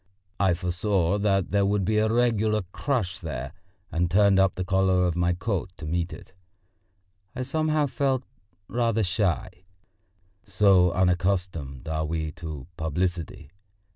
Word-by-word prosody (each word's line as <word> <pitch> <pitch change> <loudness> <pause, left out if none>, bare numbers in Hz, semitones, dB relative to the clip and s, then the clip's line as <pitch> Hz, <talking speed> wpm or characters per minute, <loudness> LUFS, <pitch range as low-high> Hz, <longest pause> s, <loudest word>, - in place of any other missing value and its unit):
I 95 -3 +3
foresaw 90 +2 0
that 100 -2 +1
there 100 0 +3
would 100 -1 +1
be 110 +3 +1
a 110 0 +2
regular 110 -3 +2
crush 120 - -2
there, 65 +4 -5 0.4
and 85 +2 0
turned 100 +1 +4
up 95 -1 +3
the 90 - -3
collar 95 -1 +2
of 85 -2 0
my 90 0 +2
coat 95 +1 -2
to 80 - -8
meet 85 +3 -1
it. - - -11 1.0
I 130 - -2
somehow 155 +2 +1
felt 135 -1 0 0.4
rather 115 -2 +1
shy 90 0 0 0.9
so 95 -2 +4
unaccustomed 90 -6 0
are 80 0 -1
we 80 -1 -2
to 80 -6 -7
publicity. 80 -1 -3
95 Hz, 140 wpm, -26 LUFS, 85-105 Hz, 1.0 s, turned